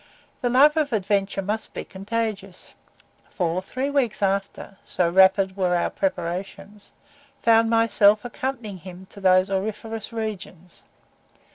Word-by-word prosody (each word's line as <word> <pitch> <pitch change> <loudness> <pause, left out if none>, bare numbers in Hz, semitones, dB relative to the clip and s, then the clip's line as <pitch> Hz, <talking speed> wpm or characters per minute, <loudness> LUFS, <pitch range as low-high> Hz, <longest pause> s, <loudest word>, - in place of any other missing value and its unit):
The 245 - 0
love 290 +5 +5
of 305 -2 +1
adventure 200 -1 0
must 210 +3 -4
be - - -4
contagious, 200 -1 -5 0.6
for 175 0 -1
three 260 +8 -4
weeks 250 -8 0
after 195 0 -2
(so 175 - 0
rapid 190 +2 +4
were 180 -2 +1
our 175 - 0
preparations) 195 +2 -4 0.5
found 225 0 +4
myself 220 -2 +4
accompanying 240 -5 -5
him 185 +1 -11
to 200 - -12
those 185 +1 +4
auriferous 215 +3 -4
regions. 205 -6 -7
200 Hz, 125 wpm, -23 LUFS, 190-225 Hz, 0.6 s, love